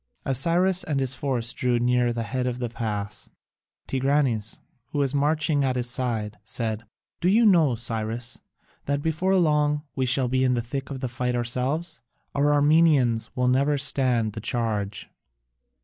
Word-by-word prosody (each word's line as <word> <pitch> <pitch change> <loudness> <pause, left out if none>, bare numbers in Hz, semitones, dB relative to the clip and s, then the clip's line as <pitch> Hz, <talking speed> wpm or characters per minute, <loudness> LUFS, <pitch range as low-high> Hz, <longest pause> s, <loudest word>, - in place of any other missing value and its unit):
As 135 -2 +2
Cyrus 180 +4 +2
and 145 -3 -1
his 135 -1 0
force 125 -3 -2
drew 125 -1 0
near 120 0 +2
the 115 -1 -3
head 125 +3 -2
of 125 -1 -2
the 120 -1 -3
pass, 105 -3 -4 0.6
Tigranes, 135 -5 0 0.3
who 145 - -6
was 140 -2 +1
marching 150 0 +1
at 130 -1 0
his 120 -1 -1
side, 115 -5 -2
said: 110 0 -4 0.3
"Do 180 - +2
you 225 +4 +4
know, 165 - +4
Cyrus, 115 +1 -3 0.5
that 140 0 -1
before 170 +4 +1
long 150 -4 +2
we 130 -1 0
shall 130 +1 +1
be 130 +1 +1
in 125 -1 +2
the 120 - 0
thick 135 +3 -5
of 135 -2 -6
the 130 - -1
fight 125 +1 -2
ourselves? 130 +6 -2 0.3
Our 145 +1 +2
Armenians 145 -5 +3
will 125 0 +1
never 140 +3 +2
stand 125 -6 +1
the 110 - -6
charge." 105 -4 -2
130 Hz, 165 wpm, -25 LUFS, 120-145 Hz, 0.6 s, you